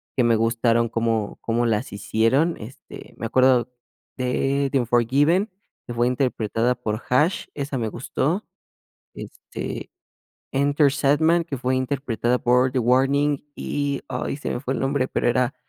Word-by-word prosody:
que 125 - +3
me 120 -1 +4
gustaron 115 +1 +2
cómo 115 -2 -1
cómo 120 +1 0
las 115 +1 -1
hicieron, 115 - +1
este, 115 +5 -11
me - - -5
acuerdo 125 0 +3 0.5
de 135 +2 0
The 135 - +2
Unforgiven, 140 - +2 0.4
que 120 - -5
fue 120 +1 +1
interpretada 125 -2 0
por 110 -2 -4
HaAsh, 150 +8 +2
esa 140 -1 -3
me 115 -3 -1
gustó, 145 - -2 0.7
este, - - -7 0.6
Enter 140 +1 +3
Sandman, 150 +4 +2
que 150 -4 -5
fue 130 +1 0
interpretada 130 -2 -1
por 125 +1 +2
The 130 - +1
Warning. 135 +4 +2
Y 145 -1 -2
ay, 130 +1 -3
se 145 - -5
me - - -2
fue 135 0 -3
el - - -3
nombre, 135 -1 0
pero 120 - 0
era 125 +2 +1
130 Hz, 150 wpm, -23 LUFS, 120-140 Hz, 0.7 s, me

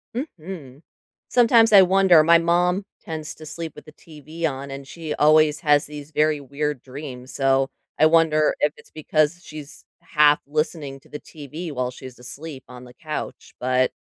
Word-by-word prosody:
Mhm. 165 - -7 0.5
Sometimes 230 -2 +5
I 200 -2 +9
wonder 185 -3 +5
my 170 +1 +6
mom 180 +3 +1 0.2
tends 155 -2 -6
to 155 - -12
sleep 160 +1 -7
with 150 - -13
the 155 - -13
TV 160 +1 -8
on 140 -2 -3
and 135 0 -8
she 160 -1 -6
always 155 0 +4
has 145 -3 +3
these 150 0 -10
very 150 0 +1
weird 140 0 -3
dreams 130 -2 -9
so, 135 0 +2 0.3
I 155 - +6
wonder 160 -2 +3
if 150 0 +1
it's - - -17
because 155 +2 0
she's 150 -1 -11 0.2
half 150 -3 +4
listening 150 -2 -3
to - - -23
the 150 - -7
TV 155 +2 -8
while 125 -2 -2
she's 130 0 -11
asleep 135 +3 -9
on 125 0 -12
the 125 0 -14
couch, 155 -2 -7
but, 130 0 +1
150 Hz, 170 wpm, -22 LUFS, 140-165 Hz, 0.5 s, I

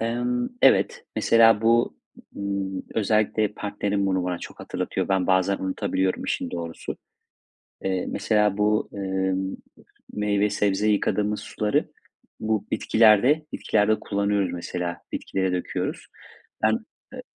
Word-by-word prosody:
Emm, 120 +2 -1
evet, 485 0 +4
mesela 115 -2 +5
bu, 115 +1 +3 0.4
ııı, 100 -1 -3
özellikle 110 0 +2
partnerim 100 -1 -2
bunu 95 -1 0
bana 90 -1 -2
çok - - -10
hatırlatıyor. - - -3
Ben 95 -2 +1
bazen 95 +1 +2
unutabiliyorum 95 0 -1
işin - - -2
doğrusu. 85 -1 -5 0.9
Eee, 95 -1 -1
mesela 105 -2 +1
bu, 105 +1 +2
ımm, 95 -1 -1 0.6
meyve 105 0 +1
sebze 105 0 +1
yıkadığımız 105 0 +1
suları 105 -1 -1 0.5
bu 110 -1 -1
bitkilerde 120 +8 +4
bitkilerde 110 0 +1
kullanıyoruz. 100 -2 0
Mesela 90 0 -4
bitkilere 95 -1 -1
döküyoruz. 90 -1 -3 0.6
Ben, - - +4 0.4
ııı - - -7
100 Hz, 115 wpm, -25 LUFS, 95-110 Hz, 0.9 s, mesela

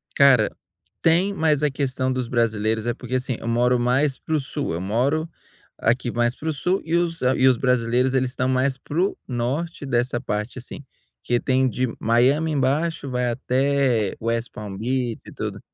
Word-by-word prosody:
Cara, 130 -6 +6 0.5
tem 175 +5 +3
mais 155 -4 +1
a 150 - +2
questão 130 -1 -1
dos 130 -2 -2
brasileiros, 110 -2 0
é 120 - 0
porque 125 +1 -5
assim, 130 -2 -1
eu - - -7
moro 120 +1 +2
mais 130 +3 +1
pro 155 -1 -1
sul, 140 - -3
eu 85 - -3
moro 130 - 0 0.5
aqui 120 +1 +1
mais 120 +1 0
pro 160 +1 -3
sul 180 +7 0
e 165 +1 0
os 170 -1 0
e 130 +1 +3
os 130 -2 +4
brasileiros 125 +1 +1
eles 130 -1 +1
estão 125 0 -1
mais 130 +1 +1
pro 170 +9 -1
norte 140 +6 -3
dessa 120 -1 0
parte 105 +5 -3
assim, 130 +3 -9 0.4
que 120 0 +1
tem 130 0 +2
de 130 +1 -1
Miami 135 +8 +3
embaixo, 145 +2 0
vai 125 -1 0
até 130 -3 +1
West 115 +1 -1
Palm 105 -2 -7
Beach 120 +1 -1
e - - -10
tudo, - - -5
130 Hz, 175 wpm, -23 LUFS, 120-140 Hz, 0.5 s, Cara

